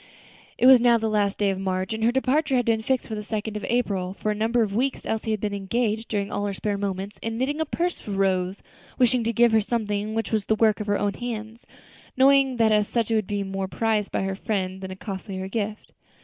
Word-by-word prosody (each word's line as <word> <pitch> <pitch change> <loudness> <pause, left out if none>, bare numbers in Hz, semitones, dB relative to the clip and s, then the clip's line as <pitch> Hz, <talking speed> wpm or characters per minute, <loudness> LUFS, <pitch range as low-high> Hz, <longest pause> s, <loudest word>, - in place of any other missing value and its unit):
It - - +2
was 260 -2 +9
now 240 -1 +5
the 225 0 -1
last 210 -2 +1
day 200 -1 +2
of 190 - -4
March, 190 +1 -2
and 220 0 -3
her 235 - +4
departure 265 +3 +1
had 245 -2 +2
been 225 -1 +2
fixed 260 +2 -1
for 225 - -6
the 210 - -3
second 215 0 -4
of 210 - -4
April. 195 -6 -1
For 215 - -1
a - - +1
number 225 +3 +1
of 200 -2 -3
weeks 260 +5 0
Elsie 220 0 -2
had 215 -1 0
been 205 0 -2
engaged, 220 +3 -1
during 200 -2 -2
all 205 - -1
her 200 - -3
spare 205 +1 -2
moments, 200 0 -4
in 225 0 -3
knitting 290 +5 -1
a - - +1
purse 345 +4 -2
for - - -11
Rose, 190 -1 0 0.3
wishing 250 -1 +3
to 230 - +1
give 235 0 +4
her 220 0 +4
something 210 -1 -2
which 225 - -2
was 215 -3 0
the 220 - +2
work 215 -1 +3
of 210 - -4
her 205 0 +2
own 205 -1 0
hands, 225 0 -6 0.5
knowing 270 -1 +5
that 225 -1 +4
as 210 -1 +3
such 230 -2 -1
it - - +3
would 215 -3 0
be 205 -1 -1
more 195 0 -3
prized 215 0 0
by - - -1
her 195 0 -1
friend 190 -2 -3
than 190 - -6
a 185 - -6
costlier 190 -1 -6
gift. 215 +1 -4
215 Hz, 250 wpm, -25 LUFS, 200-235 Hz, 0.5 s, was